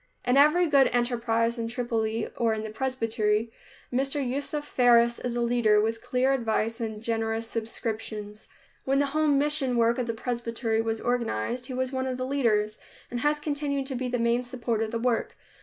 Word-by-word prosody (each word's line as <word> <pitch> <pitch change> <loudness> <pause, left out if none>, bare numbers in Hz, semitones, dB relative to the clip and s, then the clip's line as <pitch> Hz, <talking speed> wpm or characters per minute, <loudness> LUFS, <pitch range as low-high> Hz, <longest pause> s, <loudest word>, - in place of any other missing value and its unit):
In 250 - +3
every 305 +6 +5
good 280 -4 +5
enterprise, 235 -1 0
in 230 - -2
Tripoli, 230 -2 -1
or 230 -2 +1
in 215 0 -5
presbytery, 225 -3 0 0.4
Mr. 270 +1 0
Yusuf 285 +3 -3
Faris 235 -1 +4
is 245 -1 -3
a 240 - 0
leader, 235 -3 +3
with 225 +1 0
clear 255 +2 +1
advice 230 -2 -1
and 220 -1 -4
generous 225 0 -1
subscriptions. 220 -2 -5 0.4
When 270 +1 +1
the 285 - +3
home 305 -2 +3
mission 285 -3 +1
work 235 +1 +3
of 245 - -1
the 230 - -2
presbytery 230 -1 -1
was 225 0 -2
organized, 245 - -1
he 255 - -5
was 260 0 -1
one 260 -1 -2
of 255 -1 -2
the 255 - -2
leaders, 215 -6 +1 0.3
and 240 - -2
has 295 +3 +1
continued 285 -2 -2
to 265 -1 -4
be 255 +1 -2
the 245 - 0
main 235 +1 +2
support 245 -2 -2
of 220 - -1
the 230 - -2
work. 235 0 -1
240 Hz, 185 wpm, -27 LUFS, 225-260 Hz, 0.4 s, every